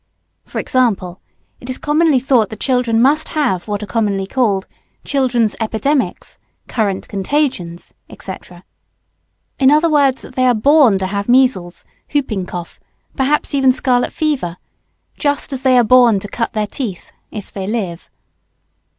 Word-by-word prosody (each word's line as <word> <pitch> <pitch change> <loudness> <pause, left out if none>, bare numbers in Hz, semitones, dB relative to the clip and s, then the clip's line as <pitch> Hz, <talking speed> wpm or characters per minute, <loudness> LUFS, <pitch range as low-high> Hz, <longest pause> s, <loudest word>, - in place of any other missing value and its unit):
For - - -8
example, 200 -8 0 0.4
it 245 - -11
is 255 - -2
commonly 300 -2 +2
thought 245 -5 +2
that 220 - -9
children 245 -3 +1
must 300 +4 +3
have 240 - 0
what 205 0 -3
are - - -4
commonly 205 -3 -1
called 200 -4 0 0.4
"children's 245 -6 +1
epidemics," 240 +6 -2 0.3
"current 205 -5 -2
contagions," 195 - -2 0.3
&c., 190 - -6 1.3
in 265 -1 +5
other 305 +3 +3
words, 280 -3 +2
that - - -12
they 255 0 +2
are 245 - +4
born 270 -2 +4
to 190 - -2
have 200 +3 -3
measles, 245 -9 +2 0.2
hooping 220 -10 -2
cough, 175 -1 -8 0.4
perhaps 280 +3 0
even 270 -2 +4
scarlet 250 -1 0
fever, 260 - -2 0.6
just 285 -1 0
as 260 - -4
they 260 -2 +4
are 245 - +5
born 235 -3 +5
to 205 - -6
cut 230 +3 -3
their 215 -1 0
teeth, 210 -4 -6 0.2
if 210 -3 -8
they 195 -1 -5
live. 195 -6 -4
245 Hz, 150 wpm, -17 LUFS, 200-270 Hz, 1.3 s, in